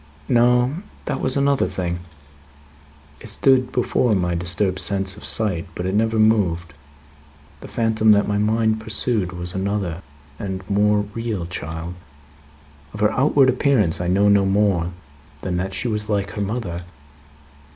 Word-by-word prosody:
"No. 125 +3 +3 0.3
That 135 - -3
was 130 - +3
another 140 0 +2
thing. 85 -1 -3 1.2
It 115 - -8
stood 130 +3 +2
before 125 -2 +1
my 90 -2 0
disturbed 90 +2 0
sense 95 0 +1
of 105 - -13
sight, 100 -5 +2
but 90 - -4
it 95 - -1
never 110 +2 +1
moved. 90 -7 +2 0.9
The - - -10
phantom 110 -1 +2
that 105 - +2
my 105 0 0
mind 110 +1 +1
pursued, 110 -3 -1
was 90 -1 -5
another 95 -3 -2 0.4
and 95 -1 -5
more 105 +1 +2
real 115 -6 -3
child. 85 -1 -5 1.0
Of 105 - -7
her 105 0 +3
outward 135 +2 +3
appearance 125 - +2
I 90 - -2
know 100 +3 +3
no 100 -1 +5
more 95 -3 +1 0.5
than 90 -2 -2
that 95 +2 -2
she 125 - -2
was 105 -2 -2
like 100 -2 -1
her 105 - -5
mother. 100 -5 -3
105 Hz, 150 wpm, -21 LUFS, 90-115 Hz, 1.2 s, no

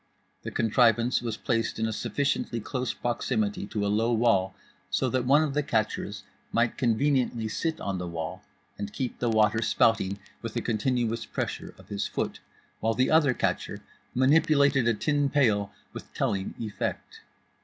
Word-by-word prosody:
The - - -5
contrivance 115 +1 +3
was 115 -2 -3
placed 115 -2 -1
in 110 - 0
sufficiently 135 +1 -1
close 125 +3 -2
proximity 110 -4 -1
to 105 -1 -2
a - - +1
low 110 +3 +2
wall 110 -5 +2 0.3
so - - 0
that 130 -1 0
one 145 +4 +5
of 150 -3 -2
the 150 - +2
catchers 110 -6 -2 0.3
might 120 0 +1
conveniently 125 -2 +1
sit 160 +8 -2
on 95 -2 -3
the 90 - -4
wall 85 +2 -5 0.4
and 100 0 -4
keep 125 +2 -4
the 120 - +1
water 110 0 +3
spouting 105 -3 +2 0.2
with 115 -1 -6
a 120 - 0
continuous 115 0 0
pressure - - -4
of - - -17
his 100 -1 -2
foot, - - -3 0.4
while 115 0 0
the 130 - +2
other 150 -5 +4
catcher - - -2 0.3
manipulated 140 -1 +4
a 115 - +3
tin 145 +3 +1
pail 105 -8 +2 0.2
with - - -9
telling 95 -1 -1
effect. 110 -3 -4
115 Hz, 160 wpm, -27 LUFS, 105-130 Hz, 0.4 s, one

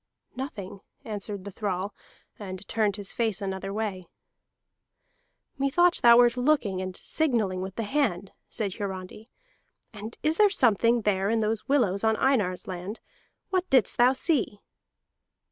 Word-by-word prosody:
"Nothing," 205 -8 -6 0.3
answered 205 -3 -5
the 200 - -7
thrall, 195 0 -3 0.5
and 190 -1 -7
turned 215 -3 +1
his 200 -2 -3
face 225 -4 0
another 195 0 -4
way. 200 -3 -3 1.5
"Methought 345 +6 +3
thou 235 -1 +8
wert 240 0 +5
looking, 245 -8 +1
and 185 -1 -5
signalling 225 -12 0
with 190 0 -6
the 230 - -2
hand," 205 -7 -1 0.2
said 205 -4 -1
Hiarandi. 195 +2 -6 0.6
"And 215 +2 -8
is 310 +1 +1
there 420 -1 +6
something 235 - +3
there 200 -2 +1
in 225 0 +1
those 215 0 -1
willows 220 -9 +2
on 220 0 +3
Einar's 210 -10 +1
land? 185 +4 -6 0.5
What 370 -1 0
didst 255 -4 +3
thou 250 +2 +6
see?" 265 - 0
215 Hz, 140 wpm, -27 LUFS, 195-245 Hz, 1.5 s, thou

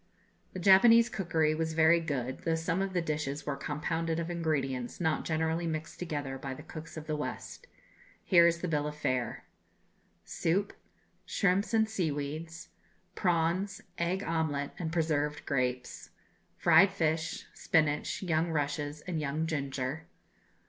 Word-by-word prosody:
The 185 - -5
Japanese 230 +6 +7
cookery 160 -5 +1
was 160 0 -2
very 160 +1 +5
good, 130 -5 -3
though 165 -1 0
some 165 +3 -1
of 195 -1 -2
the 175 -2 0
dishes 150 -2 -3
were 145 - -1
compounded 160 +3 -2
of 170 +1 -3
ingredients 135 -7 -2
not 160 -3 0
generally 160 +1 0
mixed 160 0 -4
together 145 -6 -4
by 135 0 -5
the - - -10
cooks 160 0 -9
of 155 - -6
the 155 - -2
West. 150 - -6 0.6
Here 170 -3 +6
is 170 0 0
the 180 - -1
bill 150 -2 0
of 150 - -5
fare: 130 -5 -2 0.8
Soup. 195 +5 0 0.5
Shrimps 195 +1 +1
and 220 -1 +3
Seaweeds. 160 -3 -3 0.4
Prawns, 180 +4 0 0.2
Egg 180 +3 0
Omelette, 155 -4 -1
and 160 -2 -3
Preserved 150 -3 0
Grapes. 125 -2 -2 0.5
Fried 170 +3 +6
Fish, 165 -3 -1
Spinach, 155 +2 +1
Young 165 -1 +1
Rushes, 145 -1 -2
and 170 -2 -3
Young 150 +2 -1
Ginger. 140 -1 -3
160 Hz, 140 wpm, -31 LUFS, 150-170 Hz, 0.8 s, Japanese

